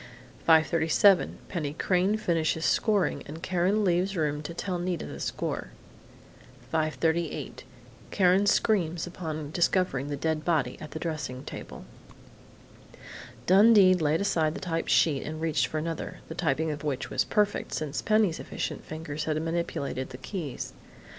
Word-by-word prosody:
5:37 165 +4 +4
Penny 150 -6 -3
Crain 185 +5 +1
finishes 165 -4 0
scoring, 200 -10 +2
and 160 +3 -9
Karen 185 +4 +1
leaves 185 +2 +1
room 150 -2 0
to 150 - -6
tell 180 +1 -3
Nita 175 -1 -2
the - - -8
score. - - -3 1.0
5:38 160 +1 -1 0.5
Karen 190 +1 +3
screams 175 -7 +2
upon 155 -4 -5
discovering 170 -5 +1
the 145 -1 -3
dead 155 +1 -1
body 150 -7 +1
at 155 - -7
the - - -7
dressing 150 -6 -4
table. - - -8 1.6
Dundee 200 - +7
laid 160 -2 +1
aside 165 -6 +1
the - - -5
typed 165 -2 -2
sheet 145 -5 +3
and 155 +1 -6
reached 160 -2 +1
for 155 - -4
another, 165 +1 -4
the - - -4
typing 160 -1 0
of 150 0 -6
which 140 -3 -3
was - - +2
perfect, 210 -2 0
since 150 -3 -3
Penny's 215 -6 +2
efficient - - -4
fingers 155 -1 -5
had 155 -1 0
manipulated 160 -5 -3
the 125 - -8
keys. 150 -1 -5
165 Hz, 140 wpm, -28 LUFS, 155-180 Hz, 1.6 s, Dundee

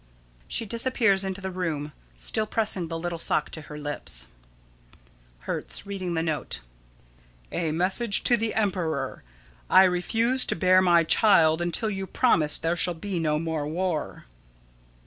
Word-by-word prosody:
[She 230 - -2
disappears 230 -3 +1
into 190 0 -4
the 190 0 -4
room, 160 -5 -3 0.3
still 215 - -1
pressing 205 -6 0
the 165 0 -4
little 170 0 -4
sock - - 0
to 155 - -6
her 150 0 -10
lips.] 145 - -4 1.2
Hertz: - - -5
[Reading 190 -3 -4
the 160 - 0
note.] 160 -3 -3 0.9
"A 165 -3 -2
Message 190 +7 +1
to 240 - +4
the 225 -1 -1
Emperor: 170 -10 -2 0.5
I 190 - +7
refuse 225 +8 +2
to - - -1
bear 185 +2 +4
my 175 -2 +4
child 165 -3 +4
until 175 +6 0
you 195 -1 -4
promise 160 - +3
there 165 +2 -1
shall 175 0 0
be 185 +2 -3
no 155 -2 0
more 160 -2 -3
war." 165 - -3
180 Hz, 145 wpm, -26 LUFS, 160-200 Hz, 1.2 s, I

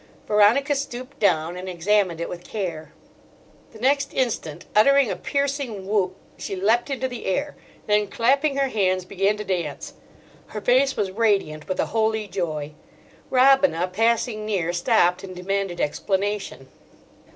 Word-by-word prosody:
Veronica 215 +8 +4
stooped 275 0 -6
down 170 -4 +1
and 185 +1 -6
examined 185 0 +1
it 170 - -3
with 175 0 -8
care. 170 -8 -5 0.8
The - - -13
next 275 +4 +1
instant, 195 - -2
uttering 275 +3 +5
a - - -2
piercing 280 -8 -2
whoop, 190 -2 0 0.2
she 195 - -4
leapt 220 +8 +1
into 260 -1 -2
the 245 -2 -7
air; 285 +10 -1 0.3
then, 210 0 +2
clapping 275 +7 +1
her 275 -1 +1
hands, 185 -5 0
began 195 +2 0
to 210 - -4
dance. 175 -7 -3 0.5
Her 215 - -6
face 260 +4 +3
was 195 -2 -1
radiant 195 -8 0
with 185 - -2
a - - +2
holy 220 -1 +1
joy. 155 -6 -3 0.6
Robina, 265 - +4
passing 225 +1 +1
near, 185 -5 -1
stopped 180 -1 +2
and 185 -1 -8
demanded 195 0 -2
explanation. 195 -2 -2
210 Hz, 145 wpm, -23 LUFS, 185-245 Hz, 0.8 s, uttering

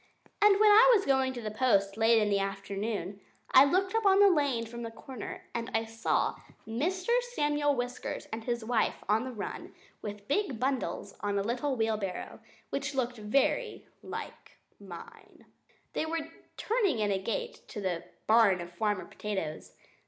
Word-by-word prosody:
And 410 -1 +6
when 425 0 +7
I 465 +4 +8
was 395 - +1
going 265 -1 +2
to 240 -2 -7
the 215 - -3
post 200 -4 +2
late 225 +1 +4
in 210 -1 +1
the 200 - +3
afternoon 195 0 -3 0.3
I 265 +2 +8
looked 375 +6 +1
up 450 - +2
the 400 -1 +6
land 265 -6 0
from 235 +1 -8
the 230 - -4
corner, 230 +1 -8
and 235 0 -3
I 225 0 +1
saw 225 0 0 0.3
Mr. 355 - -1 0.2
Samuel 295 -1 +2
Whiskers 245 0 -4
and 220 0 -4
his 235 -1 -2
wife 230 -2 0
on 215 +4 +2
the 260 - -5
run, 220 -4 -7 0.3
with 205 -1 -7
big 285 - 0
bundles 265 0 -2
on 205 -1 -1
a 200 - +1
little 255 +5 -1
wheelbarrow, 215 -5 -2 0.3
which 275 0 -3
looked 245 -2 -1
very 275 - 0 0.2
much - - -5
like - - -24 0.2
mine. 180 -4 -12 0.5
They 315 - -1
were 330 +1 -1
just 325 0 -6 0.3
turning 420 - +1
in 210 -2 +1
at 195 - +2
the - - -12
gate 480 - -3
to 215 - -7
the 175 -3 -2 0.2
barn 220 -4 +5
of 175 0 -7
Farmer 210 +1 -1
Potatoes. 190 -7 -5
235 Hz, 175 wpm, -30 LUFS, 210-290 Hz, 0.5 s, I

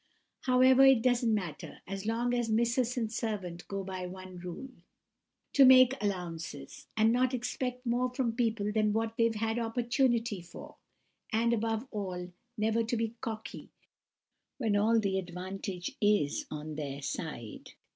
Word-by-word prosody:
However, 255 +1 +6
it 265 -4 +6
doesn't 245 -2 +3
matter, 180 -8 -3
so 195 - -4
long 235 +2 0
as 240 -2 0
Missus 235 +2 +1
and 225 -2 -1
servant 195 -7 -4
go 195 -1 -3
by 185 -1 -5
one 185 0 -9
rule—to 255 +7 -4
make 255 -1 +8
allowances, 170 -8 -5
and 220 +1 +4
not 255 +1 +2
expect 250 +1 -3
more 245 +1 +1
from 250 -2 -1
people 225 -4 0
than 215 -1 +2
what 225 +1 -1
they've 230 -1 +2
had 225 +2 -1
opportunity 235 -2 0
for; 170 - -12 0.5
and, 235 +1 +2
above 225 +2 -1
all, 180 -4 -4 0.3
never 220 +2 +1
to 230 +1 -1
be 225 0 -1
cocky 220 -1 -6 0.9
when 225 -6 0
all 220 +3 +4
the 195 -3 0
advantage 185 +1 -5
is 205 -9 +2
on 155 0 -6
their 145 -2 -4
own 140 - -9
side. 135 -8 -6
220 Hz, 145 wpm, -31 LUFS, 185-240 Hz, 0.9 s, make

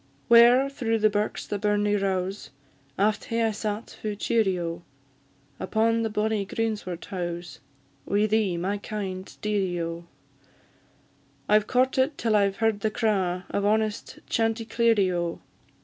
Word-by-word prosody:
Whare 240 +3 +7
through 235 -5 -1
the 215 -1 +3
birks 205 +1 -2
the 205 - -3
burnie 210 0 +1
rows, 195 0 -2 0.5
Aft 210 +1 +1
hae 230 0 0
I 225 - +2
sat 215 +1 -4
fu' 210 -1 -3
cheerie, 205 -3 +1
O! 170 0 -4 0.8
Upon 225 +3 +1
the 225 - -1
bonny 210 0 0
greensward 205 -4 -3
howes, 175 -2 -5 0.5
Wi' 205 +1 +2
thee, 215 -4 +1
my 195 +4 -2
kind 195 -3 -5
dearie, 195 -4 0
O! 170 0 -4 1.4
I've 210 0 +3
courted 260 +3 +2
till 225 -2 +1
I've 200 -1 +3
heard 225 -1 +1
the 220 - 0
craw 195 -5 0
Of 200 - -1
honest 215 0 0
chanticleerie, 225 -3 +1
O! 170 -1 -2
210 Hz, 135 wpm, -26 LUFS, 190-225 Hz, 1.4 s, Whare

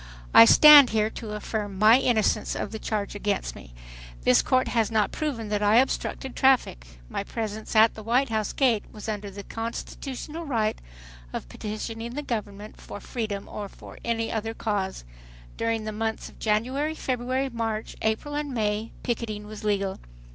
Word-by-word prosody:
"I 115 - +11
stand 295 - +9
here 215 0 +1
to 220 -2 -7
affirm 210 -2 -4
my 220 +5 +7
innocence 235 -5 +1
of - - -4
the 220 - -5
charge 210 -2 -3
against 205 -1 -2
me. - - -12 0.5
This 125 - +5
court 255 -1 +1
has 225 -3 +1
not 220 -2 +1
proven 250 -9 -3
that 210 0 -1
I 210 +1 +4
obstructed 265 +1 0
traffic. 255 - +2 0.2
My 200 - -3
presence 220 0 -5
at 220 +1 +6
the 220 - -9
White 240 +5 +1
House 215 -2 -1
gate 240 -6 +2
was 210 0 -9
under 210 -2 -4
the 200 +1 -9
constitutional 260 - -6
right 225 -8 -1 0.5
of - - -5
petitioning 225 +2 -6
the 295 - -3
government 210 -4 -5
for - - -8
freedom 210 -3 -4
or 205 -1 -6
for - - -13
any 230 -1 -1
other 225 0 -3
cause. 200 - -2 0.5
During 230 -1 -1
the 215 - -3
months 220 +1 -3
of - - -19
January, 255 +9 0
February, 255 0 -2
March, 225 -2 -3
April 220 +7 -1
and 295 -1 -3
May 215 -2 -1
picketing 220 -4 -3
was 215 0 -9
legal. 200 -2 -1
220 Hz, 170 wpm, -26 LUFS, 210-245 Hz, 0.5 s, I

